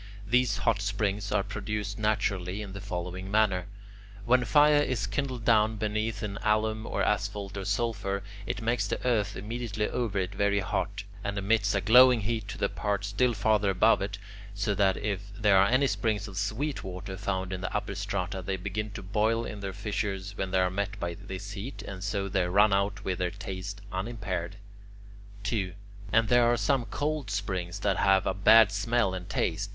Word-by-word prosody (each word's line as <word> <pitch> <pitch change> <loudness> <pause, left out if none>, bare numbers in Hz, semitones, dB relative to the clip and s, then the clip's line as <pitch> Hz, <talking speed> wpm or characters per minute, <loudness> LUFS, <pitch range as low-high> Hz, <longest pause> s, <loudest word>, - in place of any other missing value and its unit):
These 125 +3 +2
hot 110 -3 +1
springs 100 0 -1
are 100 - +2
produced 105 0 -4
naturally, 105 -2 0
in 100 -2 -8
the 100 - -7
following 90 -1 -5
manner. 100 -4 +2 0.6
When 125 +1 +4
fire 145 +5 +5
is 125 -8 -1
kindled 125 +2 -3
down 110 -1 +4
beneath 110 0 -2
in 100 -2 -3
alum 110 +1 +1
or - - -1
asphalt 100 -1 -1
or 95 -1 -4
sulphur, 100 -2 -1 0.2
it 115 - -3
makes 115 -2 +1
the - - -2
earth 105 -5 +1
immediately 110 0 -3
over 115 -5 -2
it 95 0 -1
very 100 +1 +1
hot, 100 +2 -2 0.2
and 100 0 -3
emits 100 0 +2
a 100 - +1
glowing 125 +3 +7
heat 110 0 -2
to 110 - -6
the 100 - +1
parts 100 0 -2
still 120 +4 +2
farther 105 -1 +2
above 95 +4 +4
it, 100 +1 -3 0.4
so 105 +1 0
that 100 -1 +2
if 100 -1 -3
there 105 -2 +5
are 100 - +5
any 130 +5 +3
springs 110 -5 0
of 100 - -9
sweet 110 +9 -2
water 95 0 -6
found 95 0 -2
in 95 - -4
the 95 - -3
upper - - -2
strata, 95 -1 -3
they 95 +1 -2
begin 105 +3 -3
to - - -7
boil 110 +4 +1
in 105 - -6
their 100 -1 -4
fissures 100 -1 -3
when 95 -1 -2
they 95 0 +2
are 90 0 +1
met 100 +2 -3
by 85 -3 -2
this 100 +1 -7
heat, 105 +7 -6
and 95 -1 -7
so 100 -1 -1
they 95 -2 0
run 100 +3 +4
out 100 +3 0
with 95 -1 -1
their 90 -1 +1
taste 100 +1 -6
unimpaired. 95 -3 -3 0.9
2. 100 -3 -1 0.4
And 110 +1 +4
there 120 0 +5
are 120 - +2
some 130 0 +1
cold 145 -2 -2
springs 95 -3 -3
that - - +1
have 95 -1 +4
a - - +1
bad 105 +2 +6
smell 100 0 +1
and 90 0 -6
taste. 95 +1 -1
100 Hz, 190 wpm, -28 LUFS, 95-110 Hz, 0.9 s, glowing